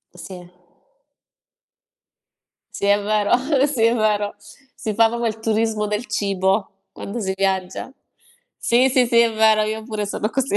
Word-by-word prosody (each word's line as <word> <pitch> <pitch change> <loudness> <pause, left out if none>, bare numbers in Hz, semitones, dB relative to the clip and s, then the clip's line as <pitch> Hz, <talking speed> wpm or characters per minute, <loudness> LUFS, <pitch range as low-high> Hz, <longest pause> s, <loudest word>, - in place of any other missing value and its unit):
Sì. 180 -2 -11 2.2
Sì, - - -3
è 205 0 +4
vero 210 +2 +2 0.3
sì, 255 -6 -1
è 230 +1 +4
vero. 210 -2 0 0.4
Si 215 -3 -5
fa 225 0 +5
proprio 235 0 -2
il 220 - -6
turismo 220 -1 0
del 210 +3 -3
cibo 195 -1 -1
quando 225 +4 -7
si 190 -1 -2
viaggia. 190 +4 -2 0.7
Sì, 250 +3 +3
sì, 255 -1 +3
sì, 235 0 +3
è 230 -1 +4
vero, 220 0 +3
io 215 +1 -3
pure 215 -2 -4
sono 210 - -2
così. 270 -5 -1
215 Hz, 150 wpm, -21 LUFS, 205-230 Hz, 2.2 s, fa